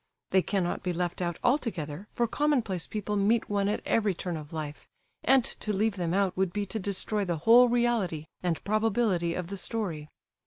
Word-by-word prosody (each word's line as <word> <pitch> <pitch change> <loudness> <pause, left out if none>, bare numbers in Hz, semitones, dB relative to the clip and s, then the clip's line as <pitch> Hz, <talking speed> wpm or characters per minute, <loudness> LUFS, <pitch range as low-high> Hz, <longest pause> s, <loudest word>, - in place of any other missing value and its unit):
They 190 - +5
cannot 185 -2 -1
be 180 -1 -2
left 175 +1 -2
out 175 -2 -2
altogether, 200 - -1
for 240 - +2
commonplace 235 - 0
people 210 -1 -3
meet 210 +2 +2
one 200 -1 +1
at 210 - -2
every 210 -4 +2
turn 175 0 -4
of 150 -1 -8
life, 150 -3 -6 0.4
and 265 -1 +5
to 215 - -2
leave 210 +1 +1
them 175 -3 -2
out 195 0 +1
would 190 -1 0
be 205 +2 -2
to 220 - -1
destroy 200 +2 0
the 175 -3 -1
whole 245 +2 +8
reality 235 -10 +1 0.2
and 175 -3 -1
probability 210 -5 +1
of 180 - -3
the 200 +3 -6
story. 180 -9 -3
195 Hz, 190 wpm, -28 LUFS, 175-220 Hz, 0.4 s, whole